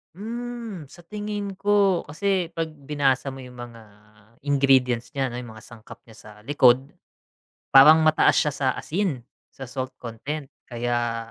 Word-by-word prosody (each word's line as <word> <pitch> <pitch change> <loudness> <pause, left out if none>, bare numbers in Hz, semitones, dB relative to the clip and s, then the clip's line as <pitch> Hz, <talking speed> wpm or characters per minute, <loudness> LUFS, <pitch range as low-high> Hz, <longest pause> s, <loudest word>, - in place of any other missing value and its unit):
Hmm, 230 -4 -6
sa 175 +6 -16
tingin 205 +1 -5
ko 200 -3 +2
kasi 175 +2 -1
pag 165 -1 -3
binasa 140 -2 -1
mo 135 - -9
yung 125 -1 -12
mga 120 -1 -10 0.6
ingredients 135 -4 +2
niya, 135 -3 -2
ano, 125 -1 -5
yung 115 -3 -11
mga 110 - -14
sangkap 115 -2 -13
niya 115 - -16
sa - - -14 0.2
likod. 130 -2 +4 0.9
Parang 155 +4 +8
mataas 155 0 +4
siya 150 - +2
sa 140 -1 -3
asin, 165 -7 -2 0.3
sa 135 -2 -9
salt 130 -1 -5
content 135 +5 -6 0.2
kaya 120 -1 -2
140 Hz, 150 wpm, -24 LUFS, 125-175 Hz, 0.9 s, Parang